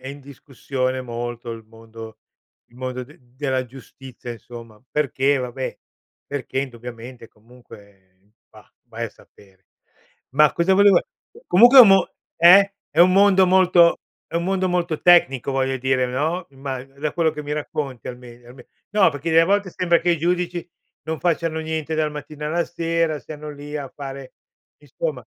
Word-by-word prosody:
è 130 - -8
in 140 +1 -8
discussione 135 -1 -4
molto 120 -1 -6
il 115 -1 -10
mondo 115 0 -13 0.5
il 120 - -27
mondo 130 0 -5
de 150 +5 -18
della 130 +1 -3
giustizia, 125 0 -11
insomma, 115 -1 -13
perché 140 -1 +1
vabbè, 130 0 -5 0.5
perché 140 -2 -5
indubbiamente 120 -1 -10
comunque 100 -4 -19 0.2
Bah, - - -18 0.2
vai - - -5
a - - -5
sapere. 95 -2 -23 0.6
Ma 150 +2 +4
cosa 190 +3 +2
volev 200 0 +6 0.5
comunque 240 +8 +7
è - - +14
un 225 - +7
mo 195 -1 +4 0.2
Eh? 195 +3 +7 0.2
È - - -6
un 180 +1 +6
mondo 195 -1 +5
molto 180 -2 +4 0.3
è - - -15
un 170 - -1
mondo 190 0 0
molto 175 -3 -1
tecnico, 140 -7 +4
voglio 135 0 0
dire, 130 0 0
no, 155 +8 -2
imma 135 -1 -6
da 140 +2 -5
quello 165 -2 +1
che 150 - -7
mi 145 - -4
racconti, 145 -4 -5
almen 120 -1 -11
alme 125 0 -15 0.2
no 200 -5 +4
perché, 145 +3 -5
delle 165 +1 +5
volte, 200 +1 0
sembra 170 -1 +1
che 175 - +1
i 170 - +1
giudici 175 +1 -2 0.4
non 160 0 -3
facciano 165 -2 -1
niente, 160 0 -4
dal 155 -1 0
mattina 150 0 -8
alla 170 +2 0
sera, 165 -2 -1
stiano 150 0 -9
lì 145 +1 -10
a 140 -2 -6
fare, 135 -1 -9 0.4
insomma - - -5
145 Hz, 165 wpm, -21 LUFS, 125-170 Hz, 0.6 s, è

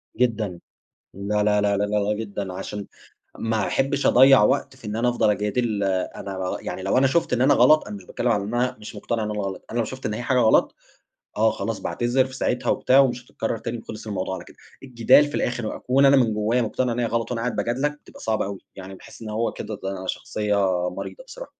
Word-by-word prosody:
جدًا، 110 -7 0 0.6
لأ، 105 +2 -1
لأ، 105 0 +3
لأ، 100 -1 +2
لأ، 100 - +1
لأ 105 0 0
جدًا، 100 -3 -5
عشان 100 +2 -6 0.5
ما 110 -3 0
احبش 140 +1 0
أضيّع 130 -2 +7
وقت 130 +3 +1
في 120 - -12
إن 105 +1 -3
أنا 120 +2 +1
أفضل 120 -3 +2
أجادل. 105 +1 -1
آآ، 95 -2 -1
أنا 95 -2 -4
يع - - -5
لو 95 +6 +1
أنا 135 - +4
شُفت 165 0 +1
إن 125 - +1
أنا 140 - +5
غلط، 140 +6 +5
أنا 105 - -6
مش 95 - -12
باتكلم 120 - -2
على 105 -4 +1
إن 110 +4 -5
أنا 125 +1 0
مش 105 0 -9
مقتنع 115 +2 -2
إن 105 - -2
أنا 105 -1 -3
غلط، 95 -1 -5
أنا 120 - -3
لو 115 - +2
شُفت 130 +3 -6
إن 105 - -2
هي 115 - -4
حاجة 130 +1 +1
غلط، 110 -3 +4 0.6
آه، 110 +1 +4
خلاص 110 +1 -3
باعتذر 120 +2 +1
في 130 0 -9
ساعتها 125 -1 0
وبتاع 130 +2 +3
ومش 125 -2 +1
هتكرر 115 0 -3
تاني 115 +2 -5
وخلص 110 -1 -9
الموضوع 95 -2 -3
على 90 - -7
كده. - - -17 0.3
الجدال 130 +2 +4
في 145 - -9
الآخر 120 -2 -1
وأكون 135 +5 +2
أنا 140 - +6
من 115 -5 +3
جوّايا 110 +4 +1
مقتنع 125 +2 -1
إن 115 - -4
هي 120 - +1
غلط 115 0 -2
وأنا 120 -2 -2
قاعد 125 0 -2
باجادلك، 145 +5 -1
بتبقى - - -15
صعبة 110 -3 -1
أوي 100 -1 -5 0.2
يعني 95 0 -9
باحس 95 - -14
إن 110 - -6
هو 110 +2 -1
كده - - -6
ده 95 -1 -4
شخصيّة 105 +2 -2 0.3
مريضة - - -8
بصراحة. - - -10
110 Hz, 230 wpm, -23 LUFS, 105-125 Hz, 0.6 s, أضيّع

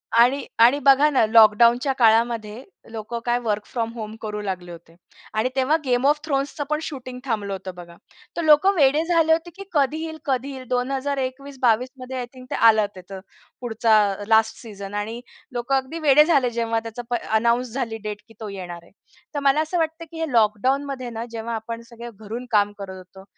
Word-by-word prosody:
आणि 250 +4 +4
आणि 245 +5 +6
बघा 280 +2 +5
ना, 260 -6 +3
लॉकडाऊनच्या 235 +4 +5
काळामध्ये 230 0 +2 0.3
लोकं 225 +1 -5
काय 240 0 +1
वर्क 210 -2 -1
फ्रॉम 230 -2 -3
होम 220 -2 -7
करू 210 -1 -4
लागले 185 -3 -5
होते. 165 0 -13 0.4
आणि 225 +4 +1
तेव्हा 265 +4 +2
'गेम 250 +1 +1
ऑफ 295 +1 +3
थ्रोन्स'चं 285 0 -2
पण 305 0 0
शूटिंग 255 -5 -7
थांबलं 210 -5 -2
होतं 190 -1 -6
बघा. 170 -1 -12 0.4
तर - - 0
लोकं 310 +6 +5
वेडे 295 +1 +4
झाले 330 -2 +3
होते, 330 +2 -1
की 395 - -8
कधी 290 -1 +1
येईल, 320 -1 -6
कधी 270 0 -1
येईल. 260 -2 -9
2021-22 260 -1 -1
मध्ये 255 +1 -6
आय 250 - -3
थिंक 255 -1 -12
ते - - -1
आलं, 220 -2 +5
तिथं 190 +1 -9 0.4
पुढचा 225 -2 +2
अ, 200 +1 -6
लास्ट 220 0 +3
सीजन 200 -3 -9
आणि 220 +3 -4 0.3
लोकं 245 +2 -1
अगदी 270 +5 -2
वेडे 300 -1 +6
झाले, 285 -6 +3
प 240 - -3
जेव्हा 230 -1 0
त्याची 230 +1 -6 0.3
अनाउन्स 235 +2 +1
झाली 230 -4 -3
डेट 210 -1 -5
की 225 - -17
तो 215 -2 -6
येणार 175 -3 -8
आहे. - - -21 0.4
तर 290 - -1
मला 280 +2 +3
असं 315 +3 -2
वाटतं 325 +1 -2
की 325 - -8
हे 320 -4 -2
लॉकडाऊनमध्ये 255 +4 +1
ना, 230 0 -5
जेव्हा 230 0 -4
आपण 230 +1 -6
सगळे 235 0 -9
घरून 225 +4 -6
काम 205 -1 +3
करत 190 -2 -8
होतो, 185 +1 -14
240 Hz, 195 wpm, -23 LUFS, 220-275 Hz, 0.4 s, आणि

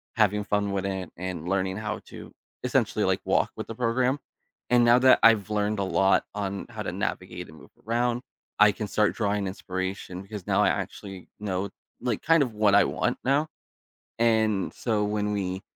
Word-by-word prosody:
having 105 -2 +2
fun 105 -1 0
with 95 -1 -2
it, 95 -3 -4
and 90 -2 -5
learning 95 -1 0
how 105 -1 -3
to, - - -10 0.3
essentially, - - +1
like, - - +1
walk - - +2
with - - -5
the 115 - -6
program. 125 +3 +1 0.5
And 120 -1 +5
now 120 +1 +6
that 130 0 +6
I've 110 -2 +5
learned 105 0 0
a 100 - +1
lot 95 +1 +2
on 100 -1 -4
how 110 -2 -6
to - - -3
navigate 90 -3 -4
and 80 - -14
move - - -16 0.2
around, 120 +1 +1 0.4
I 105 0 +7
can 105 +1 -5
start 105 +1 +1
drawing 105 -2 0
inspiration, 95 -1 -5
because 100 -1 -8
now - - +3
I - - +4
actually 95 -2 -5
know, 100 -1 -2 0.3
like, 120 -4 -1
kind 165 -2 +4
of 120 - -4
what 105 -1 +3
I - - +7
want - - -1
now. 140 +4 +2 0.7
And 110 -4 +2
so, 110 -3 0
when 105 0 -1
we 95 -1 -2
105 Hz, 185 wpm, -26 LUFS, 95-115 Hz, 0.7 s, I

